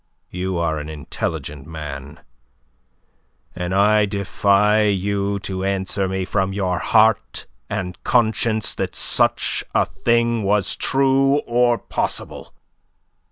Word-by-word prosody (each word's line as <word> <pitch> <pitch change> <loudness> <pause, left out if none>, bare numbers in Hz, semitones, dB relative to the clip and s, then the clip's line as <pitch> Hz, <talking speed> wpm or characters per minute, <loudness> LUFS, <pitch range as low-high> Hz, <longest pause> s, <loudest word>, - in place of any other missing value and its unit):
You 90 0 -3
are 80 -2 0
an 75 +1 -7
intelligent 75 -1 -5
man, 75 -2 -8 1.3
and 90 0 -4
I 105 +2 +4
defy 100 +1 +2
you 100 0 0
to 95 -1 -4
answer 95 0 -1
me 95 0 -2
from 95 0 -1
your 95 -2 -1
heart 110 0 +2 0.2
and 90 -1 -5
conscience 110 -2 +1
that - - -4
such - - +1
a - - +4
thing 115 -1 +1
was 100 -1 +1
true 135 +1 +2
or 120 0 +2
possible. - - -4
100 Hz, 115 wpm, -21 LUFS, 90-110 Hz, 1.3 s, I